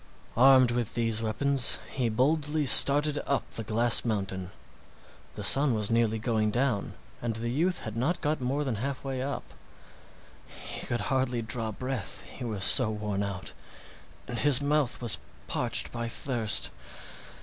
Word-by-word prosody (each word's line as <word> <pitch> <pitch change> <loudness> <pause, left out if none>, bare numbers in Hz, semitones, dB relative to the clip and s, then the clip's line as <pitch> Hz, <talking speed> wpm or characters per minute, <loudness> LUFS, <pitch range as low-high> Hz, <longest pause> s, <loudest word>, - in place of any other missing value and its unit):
Armed 130 0 +5
with 120 -2 -2
these 115 -2 0
weapons 125 +4 +2
he 125 -3 -1
boldly 150 +5 0
started 145 +2 +6
up 140 - -1
the 115 - -1
glass 115 +3 +2
mountain. 95 -5 -4 0.9
The - - -6
sun 135 -3 +4
was 105 0 -1
nearly 115 -1 +1
going 110 -1 -1
down, 120 -2 -1 0.3
and 120 -2 -3
the 120 +1 -4
youth 175 +7 -1
had 110 -2 -7
not 140 +10 -1
got 150 -1 -2
more 135 +4 -2
than 130 -6 -3
halfway 135 +2 -4
up. 140 +2 -4 1.3
He - - -7
could 120 -1 -2
hardly 125 -3 -1
draw 110 0 -4
breath 125 -2 -5
he - - -11
was 110 -5 -4
so 110 - +6
worn 105 -2 -4
out, 100 -2 -5 0.7
and 120 -2 -4
his 145 -3 +6
mouth 145 -4 -1
was 115 - 0 0.3
parched - - -2
by 120 -1 -5
thirst. 115 - +2
120 Hz, 150 wpm, -27 LUFS, 110-135 Hz, 1.3 s, started